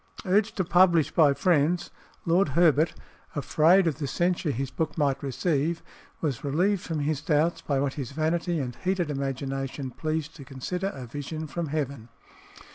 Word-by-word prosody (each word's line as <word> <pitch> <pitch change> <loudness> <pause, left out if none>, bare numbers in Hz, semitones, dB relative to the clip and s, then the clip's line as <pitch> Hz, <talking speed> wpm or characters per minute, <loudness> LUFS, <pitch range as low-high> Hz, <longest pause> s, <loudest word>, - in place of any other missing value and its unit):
Urged 205 +4 +2
to 185 - +1
publish 175 -3 +4
by 155 -5 +5
friends, 170 +2 +1 0.3
Lord 170 +1 +3
Herbert, 160 -2 +4 0.4
afraid 160 +6 +4
of 160 -2 -1
the 145 - -2
censure 175 +3 0
his 135 0 -2
book 160 -1 -3
might 140 -3 +1
receive, 150 +4 -1 0.4
was 145 -7 -2
relieved 175 +7 +1
from 160 -5 -3
his 145 0 -1
doubts 155 +2 +1
by 140 -2 0
what 135 -1 0
his 135 -4 -5
vanity 165 +3 0
and 125 -4 -4
heated 180 -4 -1
imagination 135 -1 -3
pleased 155 +2 -3
to 140 - -9
consider 145 +8 -4
a 135 -9 -6
vision 145 +5 -5
from 165 +2 -4
heaven. 140 -5 -3
155 Hz, 160 wpm, -27 LUFS, 140-170 Hz, 0.4 s, by